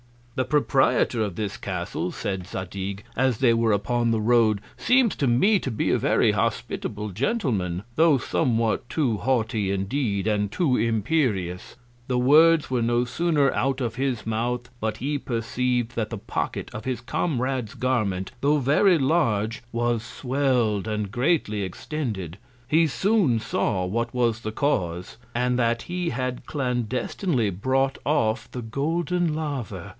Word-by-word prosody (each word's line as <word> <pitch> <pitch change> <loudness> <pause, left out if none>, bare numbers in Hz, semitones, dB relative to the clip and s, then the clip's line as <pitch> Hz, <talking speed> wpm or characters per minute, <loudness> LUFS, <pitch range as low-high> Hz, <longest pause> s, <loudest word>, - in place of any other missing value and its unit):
The 130 - -1
Proprietor 135 -5 +2
of 100 -5 -2
this 105 0 -3
Castle, - - -3
said 95 -2 -4
Zadig, 95 +2 -5
as 130 -2 +2
they 125 -2 +4
were 115 -1 +2
upon 120 +3 0
the 115 -1 +1
Road, 110 -2 +3 0.2
seems 250 -2 +3
to 140 - +1
me 190 - +4
to - - -4
be 110 - 0
a - - +2
very - - +3
hospitable 105 - -2
Gentleman; 105 - -1
tho' 160 -3 +5
somewhat 115 -2 0
too 130 -9 0
haughty 110 -3 0
indeed, 100 +1 -1
and 105 -2 0
too 150 -5 +1
imperious: 110 - 0 0.3
The 125 - 0
Words 155 +4 +5
were 125 -2 +1
no 120 +1 +2
sooner 145 0 +1
out 135 +1 0
of 120 -4 -2
his 130 -3 -2
Mouth, 120 +2 -2
but 110 -1 -2
he 145 +2 -2
perceiv'd 120 0 -1
that 110 -2 -1
the 115 - -5
Pocket - - -4
of 110 - -7
his 130 -2 -2
Comrade's 130 -4 -2
Garment, 105 -7 -1
tho' 145 +2 +3
very 150 +7 +4
large, 115 -8 +1
was 120 -1 0
swell'd, 125 -4 0
and 105 -2 -2
greatly 120 -4 +1
extended: 95 - -4 0.3
He 160 +4 +4
soon 155 - +2
saw 95 -4 -1
what 115 +5 -2
was 120 -2 +1
the 110 - -4
Cause, 90 - -1 0.2
and 125 +1 +1
that 115 -1 +1
he 175 -1 -2
had 125 0 -3
clandestinely 125 - -1
brought 130 +8 0
off 115 -7 0
the 125 - -6
Golden 165 +7 -1
Laver. 130 - -4
120 Hz, 150 wpm, -25 LUFS, 110-140 Hz, 0.3 s, tho